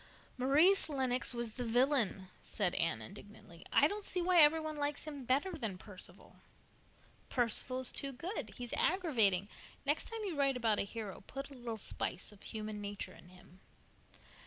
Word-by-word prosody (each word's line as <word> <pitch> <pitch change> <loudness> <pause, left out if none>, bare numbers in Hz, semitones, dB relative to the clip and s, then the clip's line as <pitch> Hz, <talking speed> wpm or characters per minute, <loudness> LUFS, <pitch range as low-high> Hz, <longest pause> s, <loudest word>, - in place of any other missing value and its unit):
"Maurice 305 +10 +4
Lennox 260 -3 +2
was 235 -2 -2
the 245 - -4
villain," 235 -5 +2
said 195 -5 -1
Anne 110 -10 0
indignantly. 195 - -12
"I - - +6
don't 410 +7 -1
see 365 - -2
why 355 -1 +5
every 305 +2 +7
one 310 -1 -4
likes 290 0 -1
him 290 -4 -7
better 275 +10 +2
than 225 - -4
Perceval." 190 0 -8 0.9
"Perceval 255 +1 +1
is 260 - +1
too 275 - 0
good. 265 - -5
He's 245 -1 -5
aggravating. 230 - +2 0.4
Next 295 +2 +1
time 455 -1 -5
you 365 -5 -3
write 275 -2 +2
about 225 -3 +2
a - - +1
hero 205 -3 -6
put 275 +1 -6
a - - -9
little 240 -3 -5
spice 190 -2 -4
of 205 - -17
human 215 -1 -5
nature 200 -2 -5
in 180 - -16
him." 180 0 -17
250 Hz, 170 wpm, -35 LUFS, 210-295 Hz, 0.9 s, every